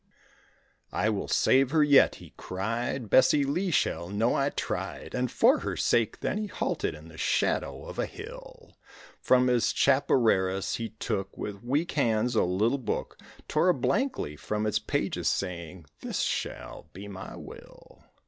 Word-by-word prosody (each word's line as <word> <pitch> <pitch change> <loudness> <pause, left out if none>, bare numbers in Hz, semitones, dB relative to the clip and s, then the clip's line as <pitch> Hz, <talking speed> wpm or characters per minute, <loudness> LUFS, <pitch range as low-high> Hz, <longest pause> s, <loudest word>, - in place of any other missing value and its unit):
"I 110 - +1
will 100 - -3
save 130 0 +3
her 155 +1 +4
yet," 145 -2 +5
he - - -14
cried, 115 +6 -3
"Bessie 140 +6 +5
Lee 170 +8 -1
shall 85 - 0
know 110 +4 +1
I 140 +1 +1
tried," - - -4
And 125 0 0
for - - +4
her - - -4
sake 115 -3 +1
then 210 - -1
he 215 - -3
halted 185 - -2
in 75 +1 -13
the 80 0 -13
shadow - - 0
of - - -8
a - - 0
hill; - - -11 0.4
From 125 0 +4
his 125 -2 +2
chapareras 110 -9 +2
he 115 -1 -4
took 95 -3 -4
With 100 0 -6
weak 145 +8 0
hands 120 -3 +1
a 110 - +3
little 105 +9 +1
book; 125 - -4 0.3
Tore 160 +4 +2
a 180 - +4
blank 260 - 0
leaf 75 0 -5
from 105 0 -2
its 105 - +1
pages - - -2
saying, 85 -2 -3
"This - - -3
shall 80 - -4
be 100 +3 -9
my 95 -1 -8
will." - - -13
115 Hz, 165 wpm, -28 LUFS, 95-140 Hz, 0.4 s, yet